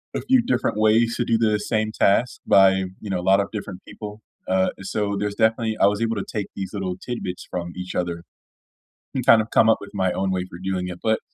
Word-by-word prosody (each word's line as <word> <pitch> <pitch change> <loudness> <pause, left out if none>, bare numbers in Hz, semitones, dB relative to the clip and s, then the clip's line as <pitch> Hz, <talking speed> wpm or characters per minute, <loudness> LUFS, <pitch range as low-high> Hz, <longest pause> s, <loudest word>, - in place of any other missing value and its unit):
a - - -1
few 260 -1 +3
different 240 - 0
ways 115 +2 +3
to 120 - 0
do 115 - +2
the 110 -2 +2
same 110 +1 -1
task 110 +3 +2
by, 95 -1 +5 0.2
you 105 - -7
know, 95 -2 -1
a - - -4
lot 95 +1 +5
of 100 - -3
different 100 -3 -6
people. 105 0 -9 0.3
Uh, 95 0 +2
so 100 +1 -2
there's 105 0 -2
definitely 110 0 +1
I - - +7
was 105 +2 0
able 115 0 0
to 100 - -3
take 105 -3 -2
these 95 -1 -4
little 95 -3 -3
tidbits 105 -7 -5
from 85 -1 -4
each 90 0 -6
other 85 -1 -2 0.9
and 130 - -2
kind 115 -1 +7
of 110 - -14
come 110 - +5
up 110 - +5
with 100 - -10
my 95 -2 0
own 95 +1 -1
way 90 -1 -1
for 85 - -9
doing 95 -1 -2
it. 90 -1 -6
But 110 0 +2
100 Hz, 240 wpm, -23 LUFS, 95-110 Hz, 0.9 s, I